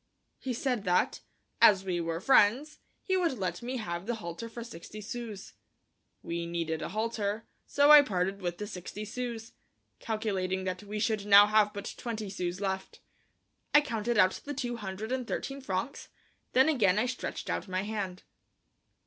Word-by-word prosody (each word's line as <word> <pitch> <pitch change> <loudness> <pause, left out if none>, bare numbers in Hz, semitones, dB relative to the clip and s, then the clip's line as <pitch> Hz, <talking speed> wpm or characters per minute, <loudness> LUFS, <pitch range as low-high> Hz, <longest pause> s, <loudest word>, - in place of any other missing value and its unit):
He 260 - -4
said 245 -3 -1
that, 180 0 +2 0.4
as 195 -2 +6
we 175 -2 -1
were 165 0 -2
friends, 265 - +3 0.2
he 375 - 0
would 340 -8 +1
let 180 -3 -3
me 250 +2 -3
have 175 -3 -4
the 240 - 0
halter 215 +2 -6
for 235 +1 -7
sixty 215 -1 -10
sous. 215 -1 -7 0.7
We 170 0 -3
needed 165 -2 -2
a - - -4
halter, 215 +1 -2 0.2
so 285 +1 +5
I 300 -1 +11
parted 195 -5 -1
with 175 -1 -3
the 210 - -4
sixty 205 +1 -7
sous, 235 0 -5 0.5
calculating 190 -4 -2
that 185 0 -3
we 210 +1 -5
should 210 -1 0
now 205 0 +9
have 210 0 +3
but 205 -1 -6
twenty 220 -4 -4
sous 180 -1 -3
left. 190 -1 -3 0.8
I 295 - +9
counted 235 -4 -2
out 185 -2 +4
the 290 0 -5
two 245 -3 -3
hundred 205 +2 -5
and 255 -2 -2
thirteen 275 +2 -4
francs, 195 +3 -4 0.4
then 260 +3 +5
again 210 -11 +3
I 215 - +2
stretched 250 -1 -4
out - - -2
my 185 0 -1
hand. 200 -3 -4
210 Hz, 170 wpm, -30 LUFS, 185-240 Hz, 0.8 s, I